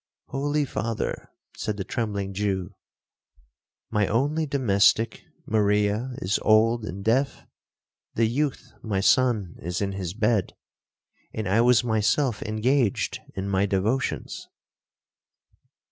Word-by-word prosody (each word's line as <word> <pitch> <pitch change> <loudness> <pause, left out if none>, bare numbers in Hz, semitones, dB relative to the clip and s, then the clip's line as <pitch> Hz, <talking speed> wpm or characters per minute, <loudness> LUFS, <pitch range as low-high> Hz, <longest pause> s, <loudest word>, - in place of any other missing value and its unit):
'—'Holy 145 +2 0
Father,' 115 -3 -3 0.3
said 105 - -3
the 95 - -2
trembling 100 -2 -3
Jew, 95 -1 -2 1.2
'my 105 -2 +2
only 145 +7 0
domestic, 115 -4 +2 0.2
Maria, 105 +3 +1
is 95 -1 -1
old 110 +1 +3
and 100 -1 -7
deaf, 130 +5 +1 0.7
the 115 - +3
youth 135 +5 -2
my 105 -4 -1
son 105 -4 +2
is 90 +1 -3
in 100 -1 -1
his 95 -2 -5
bed, 110 -3 +1 0.8
and 110 -2 -3
I 100 +5 +3
was 125 0 +5
myself 110 +2 +1
engaged 110 +1 0 0.2
in 95 +1 -3
my 100 0 +1
devotions.' 105 +7 -1
110 Hz, 115 wpm, -25 LUFS, 100-125 Hz, 1.2 s, was